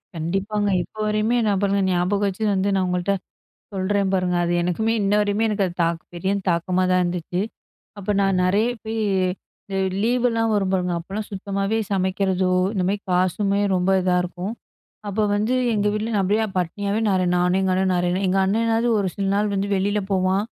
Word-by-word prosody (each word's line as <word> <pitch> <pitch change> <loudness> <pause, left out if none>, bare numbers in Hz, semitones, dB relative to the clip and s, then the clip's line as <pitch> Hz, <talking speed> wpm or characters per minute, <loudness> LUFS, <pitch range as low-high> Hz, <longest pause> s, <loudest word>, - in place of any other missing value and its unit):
கண்டிப்பாங்க, 195 +6 -1
இப்ப - - -19
வரையுமே 215 +3 +1
நான் 200 -2 +1
பாருங்க, 200 0 +1
ஞாபகம் 185 +3 +1
வச்சு 195 +3 -3
வந்து, 190 +1 +1
நான் 190 -1 +1
உங்கள்ட்ட 180 +2 0 0.6
சொல்றேன் 195 0 0
பாருங்க. 180 -1 +1
அது 170 - -1
எனக்குமே, 220 +6 0
இன்ன 200 0 +1
வரையுமே, 205 +2 +1
எனக்கு 205 -2 +1
அது 175 - -7
தாக் 165 0 -1
பெரிய 190 +3 -1 0.2
தாக்கமா 180 +2 +1
தான் 185 - +3
இருந்துச்சு. 175 +1 -2 0.6
அப்ப 205 +1 -1
நான் 195 -1 +2
நெறைய 205 +6 +2 0.2
போயி 225 +1 -3 0.7
இந்த 195 - -1 0.2
லீவெல்லாம் 230 -1 +1
வரும் 195 -2 +1
பாருங்க, 180 -1 0
அப்பலாம் 195 +5 -5
சுத்தமாவே 200 +2 -2
சமைக்கிறதோ, 190 -1 +1 0.2
இந்த 190 - -1
மாரி 200 +1 0
காசுமே 195 +3 +1
ரொம்ப 180 +1 +1
இதா 180 0 +1
இருக்கும். 180 +3 -5 0.6
அப்போ 210 +2 0
வந்து, 215 +4 0 0.2
எங்க 210 0 +1
வீட்ல 215 +2 -2
நான் 205 - +2
அப்படியே 210 +4 +1
பட்டினியாவே 200 +4 -1
நெறைய 185 -2 +2
நானும் 180 +1 +2
எங்க 190 - +1
அண்ணன் 185 0 +1
நெறைய 175 0 +1
நாள் 195 +1 0
எங்க 185 +1 +1
அண்ணேனாவது, 225 +3 +1
ஒரு 195 - 0
சில 200 -1 -2
நாள் 210 0 +1
வந்து 200 0 -1
வெளில 205 +2 +1
போவான். 190 +1 +2
195 Hz, 180 wpm, -22 LUFS, 185-210 Hz, 0.7 s, தான்